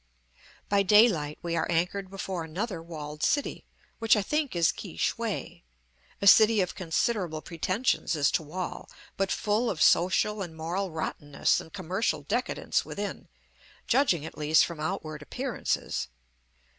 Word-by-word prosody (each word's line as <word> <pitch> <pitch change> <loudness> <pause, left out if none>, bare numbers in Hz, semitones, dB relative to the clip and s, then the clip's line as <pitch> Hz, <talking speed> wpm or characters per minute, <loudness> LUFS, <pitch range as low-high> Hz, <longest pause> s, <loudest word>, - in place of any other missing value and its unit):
By 200 0 +3
daylight 195 -8 +4
we 170 -1 -2
are 160 - -1
anchored 180 +3 0
before 190 -3 -4
another 180 +3 -4
walled 150 -2 -8
city, 285 - 0 0.3
which 225 +1 +5
I 205 - +1
think 300 - -1
is 170 -1 +4
Ki - - -9
shway, - - -2 0.6
a - - -2
city 220 +1 +7
of 180 -2 0
considerable 175 -2 -1
pretentions 185 +4 0
as 145 -2 +2
to - - +1
wall, 175 +4 -6 0.3
but 195 0 -1
full 215 +3 +1
of 165 - -3
social 190 +6 +3
and 165 -4 -6
moral 180 +5 -2
rottenness 145 -3 -1
and 160 - -13
commercial 185 -4 -2
decadence 245 - -1
within, - - -5 0.6
judging, 185 - +2
at 160 - -9
least, 155 +1 +4
from 170 -3 -7
outward 155 -2 -4
appearances. 255 - -2
180 Hz, 145 wpm, -28 LUFS, 160-210 Hz, 0.6 s, city